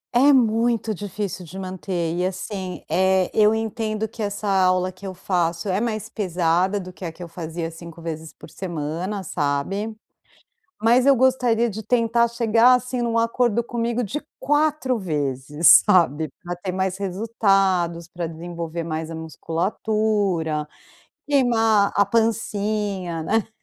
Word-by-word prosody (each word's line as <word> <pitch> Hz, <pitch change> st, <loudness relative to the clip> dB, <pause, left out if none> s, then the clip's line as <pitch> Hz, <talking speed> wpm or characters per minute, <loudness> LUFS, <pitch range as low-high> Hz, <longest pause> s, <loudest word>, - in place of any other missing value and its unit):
É 280 Hz, +4 st, +6 dB
muito 230 Hz, -2 st, +2 dB
difícil 200 Hz, -1 st, -5 dB
de 180 Hz, +3 st, -10 dB
manter 180 Hz, -2 st, -3 dB
e 180 Hz, -, -1 dB
assim, 185 Hz, 0 st, -4 dB
eh, 190 Hz, +2 st, +2 dB
eu 215 Hz, 0 st, +4 dB
entendo 220 Hz, -1 st, -2 dB
que 225 Hz, -, -9 dB
essa 205 Hz, 0 st, -3 dB
aula 185 Hz, -1 st, +2 dB
que 195 Hz, +2 st, -10 dB
eu 185 Hz, -, -6 dB
faço 175 Hz, -1 st, -1 dB
é 190 Hz, +4 st, 0 dB
mais 215 Hz, -2 st, -2 dB
pesada 185 Hz, -1 st, 0 dB
do 185 Hz, -1 st, -9 dB
que 170 Hz, -, -12 dB
a 165 Hz, -, -3 dB
que 175 Hz, -, -10 dB
eu -, -, -7 dB
fazia 165 Hz, 0 st, -5 dB
5 170 Hz, 0 st, -11 dB
vezes 160 Hz, -1 st, -6 dB
por -, -, -14 dB
semana, 175 Hz, +3 st, -4 dB
sabe? 180 Hz, +10 st, -2 dB, 0.9 s
Mas 245 Hz, +3 st, +5 dB
eu 275 Hz, -1 st, +6 dB
gostaria 245 Hz, -2 st, +2 dB
de 215 Hz, +2 st, -6 dB
tentar 235 Hz, +1 st, +2 dB
chegar, 235 Hz, +1 st, +4 dB
assim, 250 Hz, 0 st, 0 dB
num 230 Hz, -1 st, 0 dB
acordo 230 Hz, 0 st, +1 dB
comigo 235 Hz, 0 st, -2 dB
de 290 Hz, +9 st, -4 dB, 0.2 s
4 295 Hz, -4 st, +1 dB
vezes, 150 Hz, -2 st, +4 dB
sabe? 160 Hz, -6 st, +3 dB, 0.2 s
Pra 175 Hz, 0 st, -4 dB
ter 185 Hz, 0 st, -4 dB
mais 190 Hz, 0 st, -1 dB
resultados 195 Hz, -4 st, +1 dB
pra 175 Hz, -1 st, -4 dB
desenvolver 170 Hz, 0 st, -5 dB
mais 160 Hz, 0 st, -4 dB
a 165 Hz, -, -6 dB
musculatura, 170 Hz, -1 st, -1 dB, 0.6 s
queimar 225 Hz, -7 st, +3 dB
a 200 Hz, -1 st, +3 dB
pancinha, 205 Hz, -5 st, -1 dB
né. 220 Hz, +2 st, 0 dB
195 Hz, 145 wpm, -23 LUFS, 170-225 Hz, 0.9 s, É